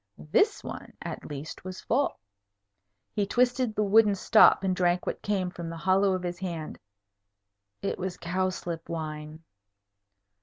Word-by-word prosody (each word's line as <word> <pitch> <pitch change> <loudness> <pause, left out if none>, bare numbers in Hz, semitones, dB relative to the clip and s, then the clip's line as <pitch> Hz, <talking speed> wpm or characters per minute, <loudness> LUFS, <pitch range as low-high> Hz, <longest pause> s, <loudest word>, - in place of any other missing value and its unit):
This - - +3
one, - - -8
at - - -6
least, 145 +1 -7
was 185 0 -7
full. 275 +5 0 1.0
He 205 -1 0
twisted 245 0 +1
the 210 - +2
wooden 210 0 +5
stop 205 +1 +6
and 185 -1 +1
drank 180 0 +1
what - - -3
came, 190 -3 -1
from 170 -2 -6
the 165 - -6
hollow 190 +3 +3
of 185 -1 -2
his 175 0 -4
hand. 170 -5 -5 1.0
It 195 - -2
was 185 -1 -3
cowslip 175 -1 -3
wine. 155 -1 -5
185 Hz, 145 wpm, -28 LUFS, 170-200 Hz, 1.0 s, stop